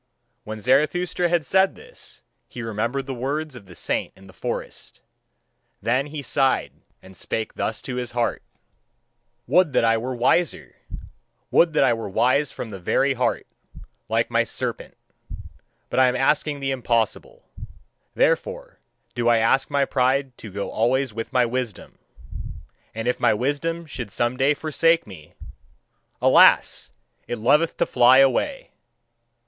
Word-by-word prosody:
When 110 Hz, 0 st, -6 dB
Zarathustra 155 Hz, -, +1 dB
had 170 Hz, -3 st, +1 dB
said 190 Hz, +5 st, +3 dB
this, 485 Hz, +2 st, -11 dB, 0.2 s
he 120 Hz, -, -8 dB
remembered 115 Hz, +5 st, -2 dB
the 135 Hz, -, -5 dB
words 140 Hz, +4 st, -3 dB
of 105 Hz, -6 st, -12 dB
the 90 Hz, -, -13 dB
saint -, -, -2 dB
in 95 Hz, -, -17 dB
the 95 Hz, -, -15 dB
forest. -, -, -6 dB, 0.8 s
Then 130 Hz, +6 st, 0 dB
he 150 Hz, -1 st, -7 dB
sighed 135 Hz, -1 st, +1 dB, 0.3 s
and 95 Hz, 0 st, -14 dB
spake 110 Hz, +3 st, -4 dB
thus 110 Hz, -, -3 dB
to 125 Hz, -, -5 dB
his 125 Hz, -2 st, -4 dB
heart: 120 Hz, -1 st, -1 dB, 1.0 s
"Would 180 Hz, -2 st, +3 dB
that -, -, +3 dB
I 115 Hz, 0 st, +3 dB
were 125 Hz, +2 st, -4 dB
wiser! 140 Hz, +8 st, 0 dB, 0.8 s
Would 165 Hz, -1 st, +4 dB
that 155 Hz, -, +3 dB
I 130 Hz, -, +4 dB
were 115 Hz, -3 st, -5 dB
wise 130 Hz, +8 st, +2 dB
from 115 Hz, -, -7 dB
the 95 Hz, -, -7 dB
very 135 Hz, +9 st, +1 dB
heart, 125 Hz, -1 st, -1 dB, 0.6 s
like -, -, 0 dB
my -, -, +3 dB
serpent! -, -, -5 dB, 0.9 s
But -, -, +1 dB
I 130 Hz, -, +6 dB
am 125 Hz, -, 0 dB
asking 145 Hz, +2 st, +1 dB
the 135 Hz, 0 st, -1 dB
impossible. 125 Hz, -, -1 dB, 0.7 s
Therefore -, -, 0 dB, 0.3 s
do 120 Hz, -1 st, -1 dB
I 120 Hz, -, +5 dB
ask 115 Hz, +4 st, +2 dB
my 140 Hz, -1 st, +1 dB
pride 130 Hz, 0 st, 0 dB
to 105 Hz, -, -9 dB
go 100 Hz, +1 st, -4 dB
always 125 Hz, +2 st, 0 dB
with 115 Hz, +2 st, -5 dB
my 125 Hz, -2 st, +3 dB
wisdom! 120 Hz, -4 st, -5 dB, 1.0 s
And 115 Hz, +1 st, -4 dB
if 125 Hz, -, 0 dB
my 120 Hz, -3 st, +3 dB
wisdom 145 Hz, +8 st, -2 dB
should 125 Hz, -8 st, -7 dB
some 120 Hz, +4 st, -1 dB
day 135 Hz, +3 st, +2 dB
forsake 165 Hz, +2 st, +2 dB
me: 90 Hz, -7 st, -13 dB, 0.8 s
alas! -, -, +4 dB, 0.4 s
it 120 Hz, -, -3 dB
loveth 145 Hz, +9 st, +2 dB
to -, -, +2 dB
fly 125 Hz, +1 st, +5 dB
away! 135 Hz, -, +2 dB
130 Hz, 150 wpm, -23 LUFS, 115-150 Hz, 1.0 s, I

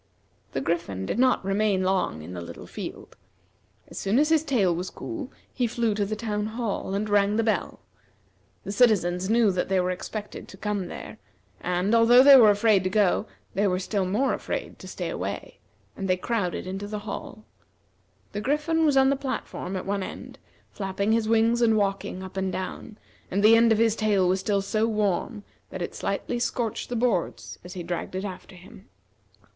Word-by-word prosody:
The 135 Hz, -, -1 dB
Griffin 135 Hz, -, -2 dB
did 215 Hz, -, -2 dB
not 255 Hz, -6 st, +3 dB
remain 195 Hz, -1 st, +1 dB
long 185 Hz, -, 0 dB
in 90 Hz, +3 st, -8 dB
the 90 Hz, -, -5 dB
little 85 Hz, -, -9 dB
field. -, -, -8 dB, 0.7 s
As -, -, -8 dB
soon 200 Hz, +4 st, +1 dB
as 300 Hz, +2 st, +3 dB
his 320 Hz, -1 st, +3 dB
tail 225 Hz, -, +2 dB
was 180 Hz, +2 st, -4 dB
cool 320 Hz, -6 st, -7 dB, 0.2 s
he 245 Hz, -2 st, 0 dB
flew 230 Hz, -1 st, 0 dB
to 205 Hz, -1 st, -1 dB
the 215 Hz, -, -2 dB
town 210 Hz, -1 st, -2 dB
hall 220 Hz, -4 st, -3 dB
and 210 Hz, +2 st, -1 dB
rang 205 Hz, 0 st, +3 dB
the 225 Hz, -, +2 dB
bell. 220 Hz, -1 st, -1 dB, 0.8 s
The -, -, -5 dB
citizens 190 Hz, -5 st, +2 dB
knew 225 Hz, -2 st, +4 dB
that 180 Hz, 0 st, -2 dB
they 190 Hz, -1 st, +2 dB
were 180 Hz, 0 st, +1 dB
expected 210 Hz, +3 st, -6 dB
to 190 Hz, -, -12 dB
come 205 Hz, -2 st, -2 dB
there, -, -, -9 dB, 0.4 s
and 180 Hz, +4 st, 0 dB
although 235 Hz, +2 st, +7 dB
they 280 Hz, 0 st, +10 dB
were 230 Hz, -5 st, +8 dB
afraid 205 Hz, -1 st, +3 dB
to 185 Hz, -, 0 dB
go, 200 Hz, -2 st, +2 dB, 0.3 s
they 200 Hz, +2 st, +2 dB
were 180 Hz, -1 st, +1 dB
still 195 Hz, +1 st, -1 dB
more 220 Hz, +9 st, +1 dB
afraid -, -, -4 dB
to -, -, -10 dB
stay -, -, -5 dB
away; -, -, -5 dB, 0.4 s
and 195 Hz, -, -4 dB
they 185 Hz, -, +3 dB
crowded 195 Hz, -3 st, -2 dB
into 195 Hz, +2 st, -5 dB
the 210 Hz, 0 st, -6 dB
hall. 215 Hz, +1 st, -7 dB, 0.9 s
The 205 Hz, -, -4 dB
Griffin 300 Hz, +6 st, +1 dB
was 285 Hz, -2 st, +3 dB
on 265 Hz, 0 st, +5 dB
the -, -, +2 dB
platform 260 Hz, -8 st, -4 dB
at 185 Hz, -, -4 dB
one 200 Hz, 0 st, -1 dB
end, -, -, -8 dB, 0.3 s
flapping 200 Hz, +1 st, -2 dB
his 225 Hz, -1 st, +1 dB
wings 230 Hz, +1 st, +3 dB
and 225 Hz, -2 st, +4 dB
walking 195 Hz, -2 st, -1 dB
up 190 Hz, 0 st, -9 dB
and 190 Hz, -1 st, -1 dB
down, 190 Hz, +3 st, -6 dB, 0.3 s
and 200 Hz, +2 st, 0 dB
the 220 Hz, +2 st, +8 dB
end 230 Hz, 0 st, +5 dB
of 220 Hz, -, +4 dB
his 225 Hz, -1 st, +3 dB
tail 205 Hz, -4 st, +2 dB
was 185 Hz, +1 st, +2 dB
still 200 Hz, +1 st, 0 dB
so 215 Hz, +3 st, 0 dB
warm 210 Hz, +1 st, -1 dB, 0.3 s
that -, -, -5 dB
it -, -, -5 dB
slightly 240 Hz, -, -2 dB
scorched 235 Hz, -2 st, -2 dB
the 245 Hz, -, -3 dB
boards 165 Hz, -, -1 dB
as 180 Hz, +1 st, -9 dB
he 180 Hz, -, -5 dB
dragged 175 Hz, +1 st, -4 dB
it 190 Hz, +2 st, -3 dB
after 185 Hz, -1 st, -8 dB
him. 190 Hz, +4 st, -15 dB
205 Hz, 195 wpm, -26 LUFS, 185-230 Hz, 0.9 s, they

